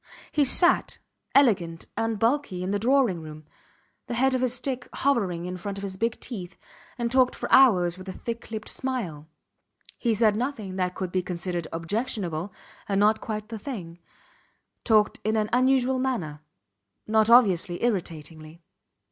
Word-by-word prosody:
He 295 -2 +2
sat, 345 +7 +4 0.4
elegant 185 -12 +3
and 225 -1 -1
bulky, 230 -5 0
in 185 - -2
the 205 - 0
drawing 240 -6 +2
room, 155 -1 -10 0.6
the 240 - -3
head 265 +2 +2
of 255 - 0
his 250 -1 +1
stick 255 -1 -4
hovering 195 -11 0
in 180 0 -5
front 200 +2 -5
of 200 - -7
his 195 -1 -4
big 225 +4 -2
teeth, 190 -7 -7 0.4
and 235 -1 -2
talked 255 -1 +3
for - - -4
hours 185 -9 +5
with 185 +1 -9
a - - -3
thick 235 +5 -6
lipped 220 -1 -6
smile 190 - -4 0.7
(he 235 -3 +1
said 215 -1 +3
nothing 220 -6 -3
that 180 -1 -1
could 185 -2 -4
be 185 - 0
considered 175 -1 -4
objectionable 180 -1 -3 0.4
and 195 -1 +1
not 215 +1 +3
quite 215 0 -5
the 225 -2 -6
thing) 185 -11 -7 0.8
talked 215 -3 +3
in 215 +1 0
an 215 -1 0
unusual 260 0 +3
manner 180 - -2 0.6
not 220 0 +2
obviously 190 -7 +4
irritatingly. 165 -6 -4
210 Hz, 160 wpm, -26 LUFS, 180-245 Hz, 0.8 s, hours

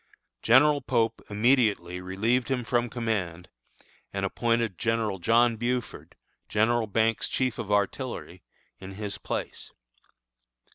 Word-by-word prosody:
General 145 +5 +5
Pope 115 -3 0
immediately 105 -6 +2
relieved 110 +8 0
him 130 -2 0
from 120 0 0
command, 100 -8 -3 0.6
and - - -2
appointed 115 -5 0
General 115 -4 0
John 115 +5 +3
Buford, 120 +1 -3 0.3
General 115 +1 +2
Banks' 110 +2 +1
chief 130 -3 -1
of 105 - -4
artillery, 100 -3 -2 0.4
in 95 0 -9
his 105 0 -5
place. - - -5
115 Hz, 110 wpm, -27 LUFS, 100-120 Hz, 0.6 s, General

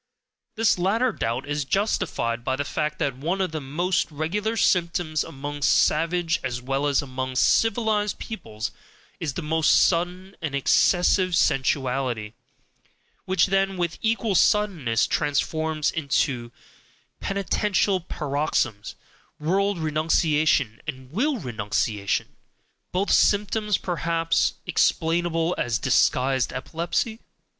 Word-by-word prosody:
This 220 -4 +2
latter 225 +8 +2
doubt 120 - -3
is 145 0 -1
justified 130 - -1
by 130 +2 0
the 145 +2 -3
fact 150 +2 -2
that 135 -3 -1
one 165 +9 -2
of 185 -3 0
the 155 -1 -4
most 175 +7 -1
regular 200 +9 -2
symptoms 170 -5 +1
among 145 +1 -7
savage 165 +4 +2
as 120 -2 -2
well 135 +3 -1
as 145 0 +2
among 130 -1 -4
civilized 215 - +2
peoples 110 - -6 0.5
is 150 -5 -3
the 175 - -4
most 160 +1 +1
sudden 180 +2 +2
and 155 -4 -3
excessive 180 +5 +3
sensuality, 130 -6 0 0.9
which 185 -3 +3
then 195 0 0
with 170 -2 -2
equal 225 -1 0
suddenness 175 - +2
transforms 155 +1 0
into 135 -5 -1 0.7
penitential 200 0 0
paroxysms, 140 - -2 0.4
world 195 +5 +1
renunciation, 155 -5 +1
and 130 -3 -7
will 265 - 0
renunciation, 105 - -2 0.6
both 190 +3 0
symptoms 210 0 +2
perhaps 165 -2 0
explainable 165 +1 +1
as 120 -2 0
disguised 130 +1 +2
epilepsy? 170 - -2
160 Hz, 110 wpm, -24 LUFS, 135-185 Hz, 0.9 s, excessive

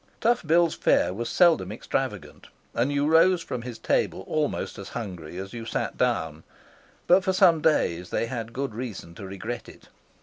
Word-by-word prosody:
Tough 240 +2 +2
Bill's 170 0 +4
fare - - +2
was 115 +4 -4
seldom 170 -3 +4
extravagant, - - -4 0.3
and 120 +5 +1
you 145 0 +1
rose 165 +3 +4
from 125 - -4
his 120 -1 -7
table - - 0
almost 150 +1 -2
as 100 - -8
hungry 90 -6 -7
as 95 +1 -6
you 115 -1 -6
sat 115 - -3
down, 80 0 -1 0.6
but 180 +2 +5
for 190 - +1
some 170 -3 +5
days 90 - +1
they - - 0
had 115 -1 -5
good 135 -1 -3
reason 110 -7 -6
to 95 +3 -9
regret 110 +5 -6
it. - - -16
120 Hz, 175 wpm, -26 LUFS, 95-160 Hz, 0.6 s, but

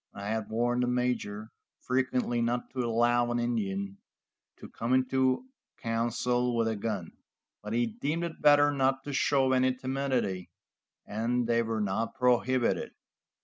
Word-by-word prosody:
I 100 +1 -5
had 110 -1 -2
warned 120 +2 +1
the 125 - +1
major 120 -4 -1 0.3
frequently 125 -2 0
not 120 +1 -1
to 130 - -6
allow 120 +1 +2
an 120 - 0
Indian 100 -5 -2 0.6
to - - -10
come 120 +3 -1
into 130 - +1 0.3
council 120 +2 0
with 115 -1 +2
a 110 - 0
gun, 100 -5 -3 0.5
but 105 +1 -5
he 120 +1 +2
deemed 150 +9 -2
it 170 -2 -5
better 145 0 +6
not 135 -1 +1
to 145 - -5
show 135 -2 +2
any 130 0 +3
timidity, 130 -8 -2 0.6
and 120 +3 -1
they 115 0 +2
were 115 -1 -2
not 105 +4 -1
prohibited. 125 -1 +1
120 Hz, 145 wpm, -29 LUFS, 115-130 Hz, 0.6 s, better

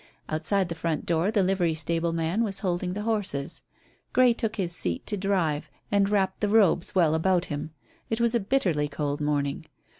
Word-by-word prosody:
Outside 185 +5 +1
the 170 - -4
front 165 -1 -2
door 170 +3 +1
the 210 -3 +2
livery 180 -3 +1
stable 165 +2 0
man 165 +6 0
was 195 -3 -3
holding 180 -1 -1
the 210 +2 -4
horses. 200 -11 -1 0.5
Grey 250 -2 +5
took 225 -1 -3
his 175 -5 -2
seat 85 -2 -2
to 210 - -1
drive, 185 -7 0 0.2
and 200 -1 +3
wrapped 200 -2 +1
the 210 - 0
robes 200 -5 +3
well 165 -4 +4
about 175 +2 +2
him. 145 +2 -4 0.4
It 225 - -1
was 235 0 +2
a 235 - +3
bitterly 190 - +1
cold 145 0 -3
morning. 145 -1 -1
180 Hz, 185 wpm, -26 LUFS, 160-205 Hz, 0.5 s, Grey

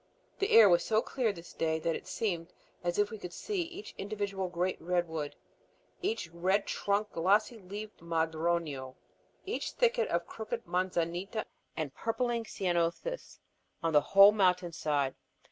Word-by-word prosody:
The 395 - +1
air 225 -2 +10
was 175 -2 +5
so 220 0 +2
clear 245 -5 0
this 170 -3 -11
day 160 -1 0
that 165 +1 -1
it - - -7
seemed 175 -6 -2 0.3
as 175 0 -1
if 205 +1 +2
we 220 - -6
could 180 -3 -7
see 410 -4 -2
each 350 +4 -7
individual 200 -2 -2
great 180 +1 -1
redwood, 165 -3 -1 0.7
each 400 - -1
red 185 +4 +1
trunked, 205 +1 0
glossy 205 +7 +2
leaved 205 +3 -8
madroño, 160 -4 -1 0.5
each 410 - -3
thicket 485 0 +2
of - - 0
crooked 230 +1 -5
manzanita 180 +3 -1 0.3
and 155 -5 -3
purpling 235 0 -1
Ceanothus, 180 - -2 0.4
on 165 -1 +1
the 150 - +7
whole 195 +6 +8
mountain 180 -4 +2
side. 145 -4 0
185 Hz, 145 wpm, -31 LUFS, 170-215 Hz, 0.7 s, air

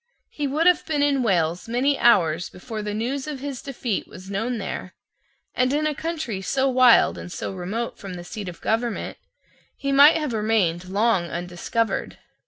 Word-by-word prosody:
He 295 -1 -2
would 305 +5 0
have 360 -3 +5
been 295 -2 +1
in 280 -2 +2
Wales 175 -6 0
many 260 +4 +2
hours 175 -7 +3
before 215 +3 -7
the 210 0 -4
news 265 +6 -2
of 295 -3 -5
his 275 -2 -5
defeat 245 -6 -3
was 185 +2 -11
known 225 +5 -1
there; 190 -3 -6 0.6
and 255 0 +1
in 300 +2 +1
a 305 - +1
country 305 - -4
so 265 +7 +1
wild 255 -2 +5
and 175 - -8
so - - -4
remote 195 +6 -4
from 195 -2 -7
the 175 - -8
seat 200 +1 -6
of 170 - -11
government, 230 0 -2 0.6
he 275 - -2
might 285 +4 +7
have 300 -6 -2
remained 200 -5 0
long 200 -2 +2
undiscovered. 175 +6 -2
230 Hz, 180 wpm, -24 LUFS, 190-275 Hz, 0.6 s, might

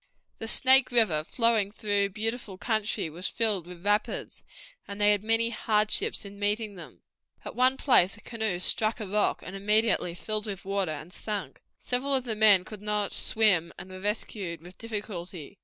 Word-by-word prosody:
The 225 - -5
Snake 265 +2 +6
River, 215 -11 +3
flowing 225 +1 +1
through 205 -2 0
beautiful 220 -1 -4
country, 215 -2 -1
was 170 +4 -3
filled 205 -7 0
with 180 +1 -11
rapids, 205 +1 -1 0.4
and 200 0 -7
they 205 0 +5
had 205 -1 +1
many 225 +1 +2
hardships 215 -1 0
in 200 0 -11
passing 210 +1 -1
them. 175 -3 -13 0.4
At - - -7
one 255 +2 +3
place 225 -8 +3
a - - -15
canoe 220 -6 -3
struck 215 +5 +1
a 215 - -4
rock, 205 +2 0
and 185 - -7
immediately 210 -3 +1
filled 215 +4 -3
with 195 -2 -6
water 195 -2 -1
and 155 +4 -8
sank. 200 -10 -5 0.2
Several 270 +3 -1
of 260 - +1
the 230 -3 -3
men 210 -4 +6
could 210 0 -9
not 210 -1 -1
swim, 195 -7 +2
and 185 - -10
were 185 - -8
rescued 195 -4 -3
with 180 +1 -14
difficulty. 200 -6 -7
210 Hz, 175 wpm, -27 LUFS, 190-225 Hz, 0.4 s, Snake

